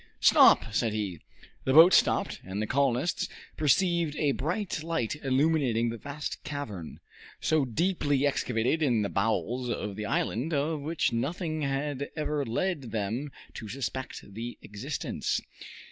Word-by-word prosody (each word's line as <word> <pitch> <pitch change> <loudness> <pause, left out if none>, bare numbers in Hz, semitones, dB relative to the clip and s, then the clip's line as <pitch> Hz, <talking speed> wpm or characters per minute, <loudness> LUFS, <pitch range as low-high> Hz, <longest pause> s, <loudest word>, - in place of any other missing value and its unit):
"Stop!" 110 - +6
said 115 -1 +1
he. 100 -6 -3 0.4
The 130 - +1
boat 170 +3 +9
stopped, - - +3
and 95 +2 -5
the 110 - 0
colonists 135 +5 +1 0.3
perceived 170 +1 +2
a 145 -2 +2
bright 170 +6 -2
light 155 -7 -1
illuminating 135 -4 +2
the 115 - -6
vast 145 +3 -6
cavern, 110 - -6 0.4
so 155 -3 +2
deeply 145 - +1
excavated 125 +1 +1
in 120 -8 +2
the 100 - -1
bowels 120 +4 0
of 105 -4 -3
the 105 0 -4
island, 140 +12 -1
of 150 +2 0
which 160 -1 0
nothing 155 +6 -2
had 140 0 -2
ever 150 -2 -1
led 140 +2 -2
them 115 +7 -2 0.2
to 110 - -7
suspect 130 -4 -5
the 115 +3 -6
existence. 120 +8 -3
135 Hz, 140 wpm, -29 LUFS, 115-155 Hz, 0.4 s, boat